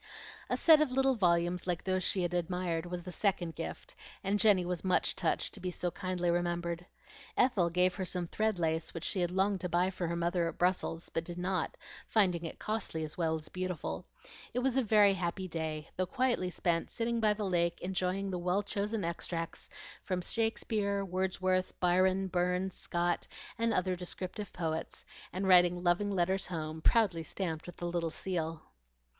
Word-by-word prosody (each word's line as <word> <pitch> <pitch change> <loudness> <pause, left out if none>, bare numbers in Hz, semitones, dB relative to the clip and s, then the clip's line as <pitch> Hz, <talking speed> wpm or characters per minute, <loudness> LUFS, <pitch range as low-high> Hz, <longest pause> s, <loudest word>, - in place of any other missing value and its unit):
A - - +1
set 315 -2 +7
of 300 -4 +2
little 270 +1 +3
volumes 175 -4 +1
like 175 -2 -1
those 185 -1 0
she 185 0 +3
had 175 0 -1
admired 175 -1 -1
was 175 0 -5
the 180 - -7
second 180 -2 0
gift, 165 - -6 0.3
and 200 +1 +1
Jenny 200 -5 +5
was 175 -1 -3
much 185 -1 +2
touched - - 0
to - - -8
be 185 0 -3
so 175 0 -2
kindly 180 -2 -1
remembered. 175 0 -1 0.5
Ethel 210 -9 +3
gave 180 +1 +3
her 190 - -3
some 180 -1 -1
thread 215 +3 0
lace 160 -1 -1
which 165 - -5
she 190 - 0
had 175 -1 +1
longed 190 +1 +1
to 180 - -2
buy 175 +2 +2
for 180 -2 -3
her 170 - -1
mother 170 0 +1
at 165 - -9
Brussels, 175 -2 0
but 165 - -1
did 175 0 -7
not, 180 -1 -1 0.3
finding 180 -6 +2
it 165 - -5
as - - -33
costly 210 -7 -2
as 155 -1 -5 0.3
beautiful. 180 - -4 0.5
It - - +2
was 265 -1 +2
a 265 - +4
very 210 -3 +5
happy 185 0 -2
day, 160 -2 -3
though 185 0 0
quietly 250 -7 +1
spent 170 -1 0
sitting 235 0 -1
by 215 -2 +3
the 210 -1 -3
lake 170 -2 +1
enjoying 190 +1 -1
the 180 - -2
well 180 +3 +1
chosen 205 0 -2
extracts 165 0 -4 0.3
from 185 -2 -1
Shakspeare, 210 -1 0
Wordsworth, 185 0 0
Byron, 185 +2 +3
Burns, 180 +1 0
Scott, 175 0 -1 0.3
and 230 0 +2
other 185 -2 +1
descriptive 185 +3 -5
poets, 160 -2 -4 0.3
and 190 +2 -2
writing 175 -1 +5
loving 180 +4 +2
letters 190 0 +1
home, 160 -2 -4
proudly 195 -4 +3
stamped 160 0 -4
with 175 - -9
the 175 - -4
little 170 -1 -1
seal. 165 -2 -3
180 Hz, 185 wpm, -32 LUFS, 170-195 Hz, 0.5 s, set